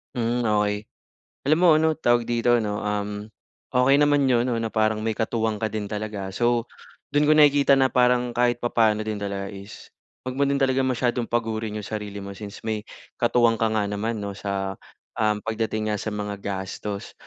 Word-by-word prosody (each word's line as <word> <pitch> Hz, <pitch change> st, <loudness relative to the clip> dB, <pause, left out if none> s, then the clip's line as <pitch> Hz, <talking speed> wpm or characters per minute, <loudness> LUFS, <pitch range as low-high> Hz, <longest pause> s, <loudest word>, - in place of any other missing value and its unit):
Hmm, 120 Hz, 0 st, 0 dB
okey. 105 Hz, 0 st, 0 dB, 0.6 s
Alam 155 Hz, +3 st, +4 dB
mo 180 Hz, -, +6 dB
ano, 160 Hz, 0 st, +3 dB
tawag 120 Hz, -6 st, +2 dB
dito 120 Hz, 0 st, +2 dB
'no, 105 Hz, -2 st, -2 dB
um, 105 Hz, 0 st, -3 dB, 0.4 s
okey 135 Hz, +3 st, +4 dB
naman 145 Hz, -1 st, +4 dB
'yon 125 Hz, -1 st, +2 dB
ano, 115 Hz, -, 0 dB
na 115 Hz, -1 st, -3 dB
parang 110 Hz, 0 st, +2 dB
may 110 Hz, -, 0 dB
katuwang 110 Hz, 0 st, -1 dB
ka 110 Hz, -, 0 dB
din 105 Hz, -1 st, -4 dB
talaga. 105 Hz, -2 st, -5 dB
So, 120 Hz, +1 st, +1 dB, 0.5 s
do'n 150 Hz, +1 st, +3 dB
ko 155 Hz, -, +5 dB
nakikita 140 Hz, -2 st, +5 dB
na 135 Hz, -, +4 dB
parang 125 Hz, -1 st, +3 dB
kahit 120 Hz, 0 st, +2 dB
papaano 110 Hz, -3 st, +1 dB
din 105 Hz, -1 st, -4 dB
talaga 100 Hz, -1 st, -3 dB
is 100 Hz, +1 st, -11 dB, 0.3 s
'wag 130 Hz, -, -3 dB
mo 140 Hz, -, -3 dB
din 140 Hz, -, +1 dB
talagang 130 Hz, -1 st, +2 dB
masyadong 120 Hz, -1 st, -1 dB
pagurin 110 Hz, -2 st, -2 dB
yung 105 Hz, -, -6 dB
sarili 105 Hz, -2 st, -5 dB
mo 100 Hz, 0 st, -7 dB
since 105 Hz, +2 st, -10 dB
may 110 Hz, -1 st, -1 dB, 0.4 s
katuwang 120 Hz, -1 st, +3 dB
ka 110 Hz, -, +3 dB
nga 105 Hz, -, +1 dB
naman 105 Hz, +3 st, -2 dB
'no 100 Hz, -1 st, -4 dB
sa, 95 Hz, -1 st, -3 dB, 0.5 s
um, 105 Hz, -1 st, +2 dB
pagdating 110 Hz, -1 st, -1 dB
nga 105 Hz, -, -3 dB
sa 110 Hz, -, -3 dB
mga 105 Hz, -1 st, -5 dB
gastos. 100 Hz, +1 st, -5 dB
110 Hz, 190 wpm, -24 LUFS, 105-120 Hz, 0.6 s, mo